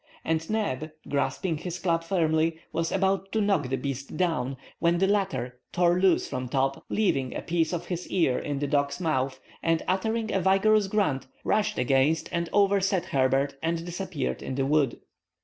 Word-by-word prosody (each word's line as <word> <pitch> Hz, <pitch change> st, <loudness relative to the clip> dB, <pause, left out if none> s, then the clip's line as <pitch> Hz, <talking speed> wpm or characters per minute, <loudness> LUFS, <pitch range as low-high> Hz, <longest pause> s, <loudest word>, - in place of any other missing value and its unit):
And 160 Hz, 0 st, -1 dB
Neb, 200 Hz, -9 st, -1 dB, 0.2 s
grasping 145 Hz, +4 st, -1 dB
his 175 Hz, +1 st, -4 dB
club 170 Hz, -2 st, 0 dB
firmly, 165 Hz, -2 st, +1 dB, 0.2 s
was 165 Hz, 0 st, -1 dB
about 195 Hz, 0 st, 0 dB
to 220 Hz, -, +2 dB
knock 195 Hz, -11 st, +1 dB
the 135 Hz, -, +1 dB
beast 135 Hz, +2 st, -5 dB
down, 135 Hz, -7 st, 0 dB, 0.2 s
when 170 Hz, +1 st, +3 dB
the 190 Hz, -, +3 dB
latter 190 Hz, -11 st, -1 dB
tore 175 Hz, 0 st, +3 dB
loose 185 Hz, -2 st, +3 dB
from 125 Hz, -1 st, -4 dB
Top, 135 Hz, +1 st, 0 dB
leaving 135 Hz, -12 st, 0 dB
a -, -, -3 dB
piece 165 Hz, -1 st, 0 dB
of 175 Hz, -1 st, -3 dB
his 175 Hz, -1 st, -4 dB
ear 165 Hz, -9 st, +2 dB
in 145 Hz, -1 st, -3 dB
the 145 Hz, -, -1 dB
dog's 140 Hz, +1 st, 0 dB
mouth, 135 Hz, -6 st, 0 dB, 0.2 s
and 165 Hz, -1 st, +1 dB
uttering 220 Hz, +4 st, 0 dB
a 190 Hz, -, +2 dB
vigorous 195 Hz, +3 st, +4 dB
grunt, 190 Hz, -11 st, 0 dB, 0.2 s
rushed 215 Hz, -1 st, +1 dB
against 135 Hz, +5 st, +2 dB
and 170 Hz, -1 st, -1 dB
overset 195 Hz, -2 st, +2 dB
Herbert 135 Hz, +1 st, +1 dB
and 165 Hz, +1 st, -1 dB
disappeared 175 Hz, -2 st, -3 dB
in 130 Hz, -, -4 dB
the 135 Hz, 0 st, 0 dB
wood. 145 Hz, -3 st, +2 dB
165 Hz, 175 wpm, -27 LUFS, 140-190 Hz, 0.2 s, vigorous